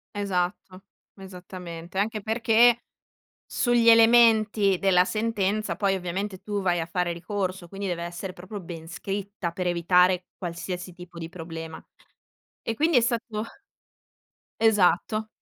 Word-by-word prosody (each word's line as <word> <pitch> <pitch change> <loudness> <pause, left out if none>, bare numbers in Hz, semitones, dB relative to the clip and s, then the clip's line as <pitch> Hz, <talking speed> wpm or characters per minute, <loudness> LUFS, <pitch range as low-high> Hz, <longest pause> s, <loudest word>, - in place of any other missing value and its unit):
Esatto, 185 -1 -2 0.3
esattamente. 180 -2 -9
Anche 215 +1 -1
perché, 230 +2 +4 0.7
sugli 240 -2 +2
elementi 225 -4 +5
della 180 -2 +4
sentenza, 215 0 -1
poi, 200 -2 +1
ovviamente 190 +2 -4
tu 205 0 -3
vai 175 -2 +1
a 165 - -3
fare 175 +1 -1
ricorso, 185 0 -4
quindi, 195 +2 -6
deve 170 -2 -3
essere 175 +2 -6
proprio 185 +4 -8
ben 165 -2 -9
scritta, 195 +1 -4
per 180 +1 -3
evitare 180 +1 +3
qualsiasi 180 0 -5
tipo 175 -1 -12
di 165 -1 -6
problema. 165 -2 -8 0.8
E, 230 - -2
quindi 315 +2 +3
è - - +6
stato 230 -2 -2 1.1
Esatto. 215 0 +2
190 Hz, 125 wpm, -26 LUFS, 175-215 Hz, 1.1 s, è